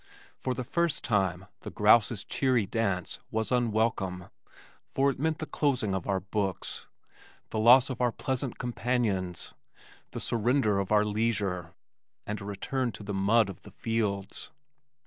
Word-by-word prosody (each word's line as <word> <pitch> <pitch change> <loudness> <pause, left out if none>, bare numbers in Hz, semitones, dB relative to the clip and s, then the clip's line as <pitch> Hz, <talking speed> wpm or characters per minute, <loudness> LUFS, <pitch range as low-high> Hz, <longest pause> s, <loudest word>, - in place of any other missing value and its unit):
For 130 -1 -2
the 125 - -3
first 170 +4 0
time 95 -5 0
the - - -7
grouse's 105 0 +4
cheery 125 -3 +1
dance 95 -4 -1
was 110 +2 -2
unwelcome 110 -6 0 0.6
for 140 +1 +2
it - - -9
meant 160 +2 0
the 155 - -4
closing 130 -11 0
of 95 -2 -3
our 100 -1 +1
books, 95 -1 -3 0.6
the 110 - -1
loss 125 +4 +7
of 125 - -5
our 120 -1 +3
pleasant 130 +2 -3
companions, 115 -7 -1 0.6
the - - -6
surrender 115 -2 +2
of 100 0 -3
our 105 0 +4
leisure, 105 -5 -1 0.5
and 105 -1 -4
a - - -7
return 120 +5 -2
to - - -9
the 100 0 -4
mud 100 +3 +3
of 95 -5 -9
the - - -13
fields. 105 -4 -2
110 Hz, 150 wpm, -29 LUFS, 100-125 Hz, 0.6 s, loss